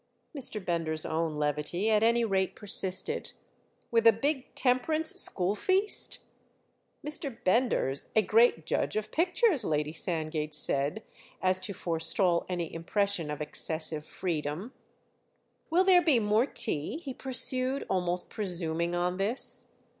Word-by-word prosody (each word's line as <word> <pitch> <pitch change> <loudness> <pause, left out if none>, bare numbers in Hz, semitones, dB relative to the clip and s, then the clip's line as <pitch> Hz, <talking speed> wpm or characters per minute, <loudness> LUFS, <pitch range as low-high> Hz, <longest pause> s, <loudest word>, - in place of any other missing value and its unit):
Mr. 255 -6 +2
Bender's 165 -2 -2
own 160 -1 -2
levity 150 +6 -2
at 210 -1 +3
any 235 +1 +3
rate 190 -3 -1
persisted. 190 -3 0 0.6
"With 230 -1 +3
a - - +9
big 265 +4 -3
Temperance 310 +5 +2
school 185 +1 +2
feast?" 380 - 0 0.9
"Mr. 290 -5 -1
Bender's 185 - +1
a 220 - +4
great 215 -6 +3
judge - - -1
of 215 0 -3
pictures," 355 - +1
Lady 150 -3 -1
Sandgate 155 -2 -3
said 145 +7 +1 0.4
as 185 0 +1
to 185 +2 -5
forestall 170 +1 +1
any 175 -3 -4
impression 180 0 -1
of 150 0 -5
excessive 155 0 -1
freedom. 165 - -4 1.0
"Will 345 +3 +3
there 370 -2 +5
be 310 -7 +3
more 215 +4 +1
tea?" 215 - -1
he 285 -6 -7
pursued, 260 +1 +1
almost 180 -1 0
presuming 170 -4 -2
on 180 +1 -1
this. 210 +7 +1
190 Hz, 130 wpm, -29 LUFS, 165-245 Hz, 1.0 s, a